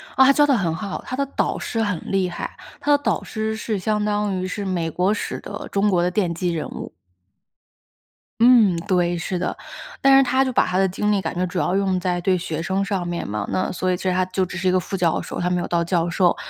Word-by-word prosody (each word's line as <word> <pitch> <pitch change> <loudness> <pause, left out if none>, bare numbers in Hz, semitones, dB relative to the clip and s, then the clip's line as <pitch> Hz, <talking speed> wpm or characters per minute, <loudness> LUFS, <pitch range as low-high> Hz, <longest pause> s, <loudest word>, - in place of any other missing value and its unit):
啊， 265 - +6
她 - - +8
教 295 +1 +5
得 280 -2 +3
很 175 -8 0
好， 200 +2 -5
她 255 - -4
的 280 +1 0
导 275 - -1
师 225 - -2
很 205 -6 -1
厉 190 -2 +1
害， 175 - -6 0.2
她 290 0 +3
的 285 - -3
导 220 - 0
师 220 0 -3
是 220 -1 -3
相 210 +2 0
当 205 -2 0
于 185 - -2
是 200 +2 -4
美 175 -4 -1
国 180 +5 +1
史 - - -4
的 - - -7
中 200 +1 +2
国 180 -3 +2
的 180 - +1
奠 180 -2 0
基 175 +1 -1
人 160 - -3
物。 - - -7 1.5
嗯， 230 -6 +6
对， 175 -3 +2
是 180 +2 -3
的。 180 - -2 0.5
但 275 0 +7
是 270 - +6
她 260 +1 +2
就 260 - -1
把 - - +3
她 185 - -1
的 190 0 +3
精 210 +3 0
力 200 -2 +2
感 165 -1 -4
觉 180 +1 0
主 180 0 -3
要 180 - 0
用 195 -2 +1
在 180 0 -1
对 185 +2 +2
学 165 -2 -4
生 190 +3 0
上 195 -4 -2
面 175 0 -3
嘛， 105 0 -3
那 185 - 0
所 185 0 -1
以 - - +1
其 - - -9
实 185 - +1
她 185 0 +1
就 185 +1 -1
只 180 - -7
是 185 +2 -1
一 - - +4
个 185 - +3
副 195 +2 -4
教 170 -3 +1
授， - - -6
她 180 - 0
没 180 -1 0
有 - - -3
到 170 -1 +1
教 170 0 0
授， 175 0 +2
185 Hz, 285 characters per minute, -22 LUFS, 175-210 Hz, 1.5 s, 她